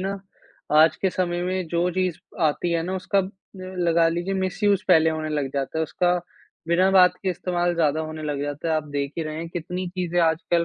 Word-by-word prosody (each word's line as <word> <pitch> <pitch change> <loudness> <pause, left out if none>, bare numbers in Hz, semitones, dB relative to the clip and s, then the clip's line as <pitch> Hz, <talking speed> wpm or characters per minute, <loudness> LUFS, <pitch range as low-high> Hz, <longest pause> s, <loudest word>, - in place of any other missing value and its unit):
ना 195 +1 -3 0.6
आज 160 - +4
के 190 - 0
समय 175 -1 -1
में 185 0 -2
जो 170 +2 +1
चीज़ 185 -2 -1 0.3
आती 160 +3 +1
है 165 - +1
ना 185 +3 -3
उसका 190 +2 0
उम, 190 0 0 0.3
लगा 175 -3 +1
लीजिए 175 +4 -2
मिसयूज़ 200 +1 +1
पहले 160 -3 +5
होने 155 0 -3
लग 145 -3 -1
जाता 135 +2 -2
है - - +1
उसका 175 +3 +1 0.6
बिना 180 +3 +4
बात 180 -2 +6
के 190 - 0
इस्तेमाल 175 0 -1
ज़्यादा 155 -2 +1
होने 155 0 -6
लग 145 -2 -3
जाता 145 +3 -4
है। 160 - +2
आप 155 - -2
देख 140 0 -1
ही 165 - 0
रहे 155 0 -5
हैं 165 +1 -5
कितनी 180 +2 -4
चीज़ें 175 -1 -2
आजकल 170 +1 +2
175 Hz, 215 wpm, -24 LUFS, 160-185 Hz, 0.6 s, बात